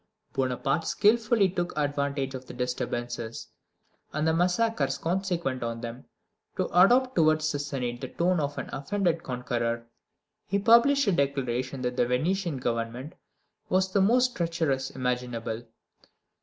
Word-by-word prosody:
Bonaparte 135 +5 0
skillfully 220 -1 +3
took 175 -3 -3
advantage 140 -2 -1
of 130 -1 -7
the - - -9
disturbances, 120 -2 -3 0.6
and 150 +1 0
the 160 - +3
massacres 175 -5 +1
consequent 170 -5 -1
on 115 -1 -3
them, 120 +1 -7 0.5
to - - +1
adopt 245 +8 +5
towards 155 -1 +3
the 145 - -2
Senate 125 -4 -3
the 130 - -4
tone 175 +5 +1
of 145 -1 -2
an - - -4
offended 170 +3 0
conqueror. 120 -2 -2 0.6
He 200 - +1
published 235 +7 +5
a 200 - +3
declaration 135 -4 -1
that 125 0 -2
the 120 - +3
Venetian 170 +5 0
Government 120 +4 -3 0.6
was 185 0 +2
the 200 - +4
most 245 +5 +3
treacherous 160 -6 -1
imaginable. 125 -2 -3
145 Hz, 135 wpm, -27 LUFS, 125-185 Hz, 0.6 s, adopt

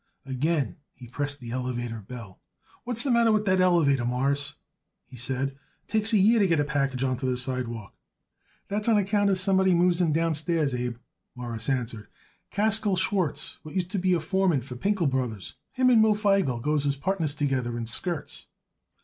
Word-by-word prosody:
Again 135 - -1 0.2
he 125 - -12
pressed 145 +4 -4
the 120 -3 -8
elevator 120 -2 -3
bell. 105 -2 -10 0.5
"What's 240 -1 +2
the 275 - 0
matter 235 -1 +4
with 215 0 +1
that 185 -2 +3
elevator, 160 -8 +3
Mawruss?" 140 +4 -1 0.5
he - - -14
said. 130 +2 -2
"It 135 - -24 0.3
takes 220 +1 +2
a 220 - +4
year 220 +4 +5
to 200 - +4
get 165 -3 +2
a - - +3
package 140 -3 -1
on 130 -1 0
to 130 +1 -3
the 125 -1 0
sidewalk." 125 -5 -4 0.7
"That's 210 +3 -1
on 220 - +5
account 205 0 +2
of 190 - +2
somebody 190 -1 +3
moves 175 0 +3
in 165 -3 +2
downstairs, 160 -2 0
Abe," 125 -1 -2 0.4
Morris 120 -1 -5
answered. 120 -5 -2 0.4
"Kaskel 210 -1 +2
Schwartz, 180 -6 0
what 155 +3 -11
used 180 -1 -1
to 200 - -1
be 180 -1 +2
foreman 170 -2 +1
for 125 0 -9
Pinkel 195 - 0
Brothers, 125 -7 -3 0.2
him 255 -1 +3
and 230 -3 +6
Moe 220 -1 +4
Feigel 195 - +1
goes 150 +3 0
as 140 - +1
partners 155 0 -1
together 130 -5 -1
in 115 - -3
skirts." 160 +7 -3
150 Hz, 185 wpm, -26 LUFS, 125-190 Hz, 0.7 s, and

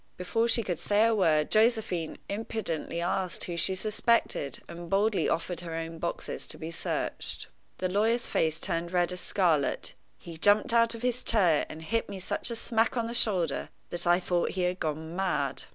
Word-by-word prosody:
"Before 225 +6 0
she 230 0 +2
could 175 -5 -3
say 210 +2 +3
a 230 - +3
word, 160 -7 +2
Josephine 215 -7 +2
impudently 200 -6 -3
asked 180 +1 -1
who 175 - -4
she 180 +3 +2
suspected, 215 - +1
and 170 0 -8
boldly 205 +2 +2
offered 170 +1 -1
her 165 -2 -5
own 165 0 -5
boxes 170 - -4
to - - -5
be 160 +1 -6
searched." 165 - -3 0.3
The 185 - -1
lawyer's 220 +5 +1
face 160 0 0
turned 170 +1 -2
red 175 0 +2
as 180 - -4
scarlet. 165 -8 +1 0.2
He 165 -1 -10
jumped 205 +6 +4
out 230 0 +4
of 230 - -9
his 250 0 0
chair, 180 -9 +3
and 160 +1 -8
hit 225 +7 -1
me 195 - -6
such 185 - -1
a 235 - -3
smack 230 +1 +1
on 230 - +1
the 230 - -4
shoulder 180 -11 +1 0.2
that 175 0 0
I 175 +1 +5
thought 175 -1 0
he 185 - +1
had 180 +1 0
gone 160 +2 -3
mad. 180 -8 -1
180 Hz, 190 wpm, -29 LUFS, 165-220 Hz, 0.3 s, I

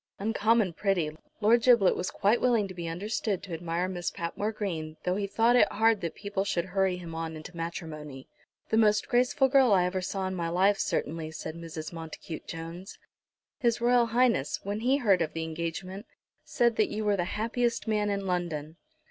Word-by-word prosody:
"Uncommon 215 -1 +2
pretty." 170 -5 0 0.3
Lord 230 +3 +5
Giblet 235 -6 +5
was 180 - -2
quite 210 +4 +2
willing 235 -5 +3
to 185 - -8
be 170 -2 -5
understood 200 +3 -2
to 185 - -7
admire 170 +2 -2
Miss 175 -2 -3
Patmore 185 +6 -3
Green, 165 -7 -4
though 180 0 0
he 200 0 -1
thought 230 +4 +3
it 245 - +5
hard 220 0 +3
that 170 - -4
people 200 -1 -2
should 175 -3 -1
hurry 190 -2 +2
him 170 -2 -8
on 160 0 -4
into 155 +3 -10
matrimony. 155 -5 -6 0.4
"The 220 - +2
most 215 -2 +3
graceful 250 +3 +3
girl 265 -4 +5
I 180 -2 +4
ever 185 +1 -1
saw 190 +1 -3
in 185 - -2
my 170 -2 -2
life, 190 +4 +3
certainly," 160 +1 -2
said 160 0 -6
Mrs. 165 -1 -7
Montacute 160 0 -8
Jones. 165 +4 -7 0.6
"His 235 -2 +1
Royal 240 0 +4
Highness, 230 - +1
when 205 +2 -3
he 255 +5 +2
heard 200 -9 +3
of 160 -2 -1
the 165 - -3
engagement, 170 +5 -5 0.4
said 235 -2 +1
that 215 - +3
you 215 0 -3
were 205 -1 +3
the 175 -3 -1
happiest 235 +2 -1
man 210 -1 +1
in 200 -1 -2
London." 165 -4 -3
190 Hz, 190 wpm, -28 LUFS, 165-220 Hz, 0.6 s, Lord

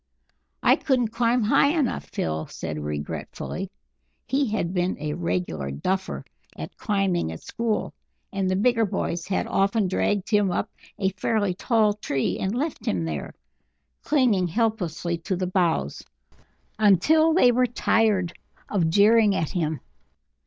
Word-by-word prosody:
"I - - +5
couldn't 250 -5 +1
climb 235 +1 +1
high 285 +9 +3
enough!" 280 -6 0
Phil 80 -1 -3
said 80 -2 -5
regretfully. 75 0 -5 0.6
He 270 +2 +1
had 190 -5 -1
been 180 0 0
"a 150 0 -3
regular 85 - -2
duffer" 190 - -2 0.3
at - - -7
climbing 195 - 0
at 80 - -9
school, 230 -2 -2 0.4
and 195 -1 0
the 185 - +1
bigger 230 +3 +3
boys 170 -2 -3
had 190 - 0
often 195 +1 +1
dragged 195 +2 0
him 205 -2 +3
up 175 - -2 0.3
a 195 -2 0
fairly 205 0 0
tall 215 +2 +2
tree 140 -10 -2
and 195 +4 -1
left 295 +5 -3
him 85 -4 0
there, 75 -3 -5 0.7
clinging 240 -11 +2
helplessly 175 -5 -1
to 185 +3 -2
the 185 +1 -2
boughs, 175 - 0 0.8
until 295 - +5
they 250 -9 +6
were 250 +1 +2
tired 215 -6 +1 0.4
of 175 -6 +1
jeering 210 +3 +5
at 160 - -1
him. 160 -5 -2
195 Hz, 140 wpm, -25 LUFS, 170-225 Hz, 0.8 s, they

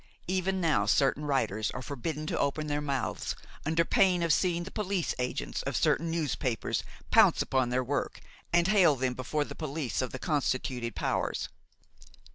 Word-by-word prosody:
Even 190 +1 0
now 150 - +2
certain 140 +6 +2
writers 110 -7 0
are - - -5
forbidden 150 +3 -4
to - - -2
open 140 +2 0
their 145 0 -1
mouths, 140 -3 -2 0.3
under 165 +1 +2
pain 180 -1 +3
of 165 -2 +3
seeing 175 -1 +1
the 190 - -8
police 200 -4 -1
agents 125 0 -2
of - - -2
certain 165 +1 +2
newspapers 145 -7 -1 0.3
pounce - - +6
upon 130 -2 +1
their 125 +1 +1
work 145 +3 -2 0.3
and 175 +1 +4
hale 190 -7 +5
them 130 -1 -1
before 145 +4 -2
the - - -8
police 145 -8 -3
of 130 - -2
the - - -5
constituted 130 -5 -1
powers. - - -1
150 Hz, 165 wpm, -30 LUFS, 130-170 Hz, 0.3 s, pounce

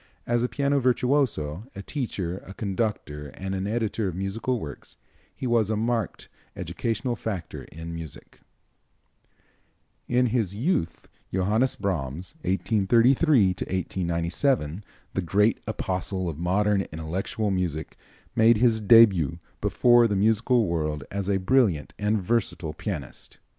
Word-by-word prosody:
As 120 0 +1
a 125 - 0
piano 140 0 +1
virtuoso, 125 - +1
a 100 - -7
teacher, 95 - -3
a 95 - -9
conductor 95 -8 -3
and 95 0 -4
an 95 +1 -2
editor 110 -1 -1
of 90 - -4
musical 110 +6 -2
works, 75 -7 -8 0.4
he - - -6
was 115 -4 +2
a 110 - +1
marked 115 -2 -2 0.3
educational 120 +1 -2
factor 100 -8 -5
in 80 +1 -8
music. 80 -3 -9 1.7
In 125 +1 +3
his 105 -6 0
youth 110 - -1 0.2
Johannes 105 +8 +1
Brahms 90 -3 -3
(1833 115 - +3
1897), 90 - -1 0.3
the 95 - 0
great 105 +5 +2
apostle 95 -3 -2
of 80 -2 -5
modern 100 +3 +2
intellectual 90 +6 -2
music, 90 -5 -2 0.4
made 110 0 +5
his 115 -1 +3
début 100 - +6 0.2
before 120 -1 +5
the 105 - -1
musical 110 +4 +3
world 75 -4 -2
as 100 0 -3
a 100 - +3
brilliant 95 - +2
and 105 +1 +1
versatile 95 -6 -1
pianist. 80 - -6
100 Hz, 125 wpm, -26 LUFS, 90-115 Hz, 1.7 s, début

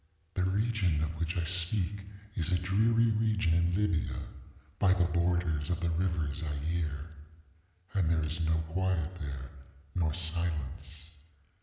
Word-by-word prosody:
ŌĆ£The 95 0 +1
region 100 -7 +1
of 80 - -1
which 85 +2 -1
I 85 - +1
speak 90 +3 0 0.3
is 85 -1 -1
a 90 - +4
dreary 110 +5 +3
region 110 -5 +2
in 85 +1 +2
Libya, 100 -5 +1 0.6
by 95 -1 +5
the 90 -2 +3
borders 85 -3 +1
of 90 -1 0
the 85 -1 0
river 85 -4 0
Zaire. 75 0 -2 0.9
And 90 -5 +2
there 80 -1 +2
is 80 +2 -1
no 80 0 +2
quiet 90 -1 0
there, 70 -4 -6 0.4
nor 80 -4 +1
silence. 80 -2 -2
85 Hz, 140 wpm, -31 LUFS, 80-95 Hz, 0.9 s, by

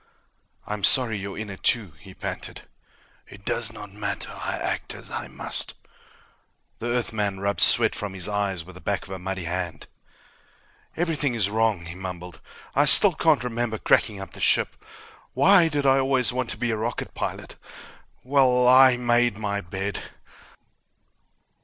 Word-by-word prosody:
"I'm 105 -1 -5
sorry 120 +1 +4
you're 100 0 -7
in 105 -1 -6
it, 95 - -11
too," 110 -7 +1
he 95 +5 -14
panted. - - -7 0.6
"It 100 0 -15
does 115 -1 -1
not 105 -3 -10
matter. 105 - -4
I - - -5
act - - -3
as - - -8
I - - -5
must." - - -4 1.0
The 120 - -4
Earthman 110 -5 -2
rubbed 100 +1 -2
sweat - - +6
from 100 -2 -5
his 90 -2 -1
eyes 100 -4 -2
with 95 - -12
the 90 - -13
back 100 - -2
of - - -13
a 95 - -6
muddy 95 0 -5
hand. 85 0 -4 1.1
"Everything 150 -6 -1
is 100 -3 +1
wrong," 110 -5 0
he 85 - -7
mumbled. 90 -1 -8 0.3
"I 145 - +3
still 185 +6 +9
can't 155 -6 +2
remember 120 -2 -2
cracking 105 -1 +1
up 95 - -9
the - - -10
ship. - - +2 0.6
Why 195 -4 +5
did 145 -3 -2
I 135 0 +4
always 130 -2 +1
want 125 -2 -3
to - - -5
be 120 -1 -1
a 110 - -2
rocket 115 +2 -4
pilot? - - -5 0.7
Well... 125 -2 +3
I 130 0 +7
made 120 -2 +1
my 100 -1 -2
bed!" 95 +3 -5
110 Hz, 165 wpm, -24 LUFS, 95-125 Hz, 1.1 s, still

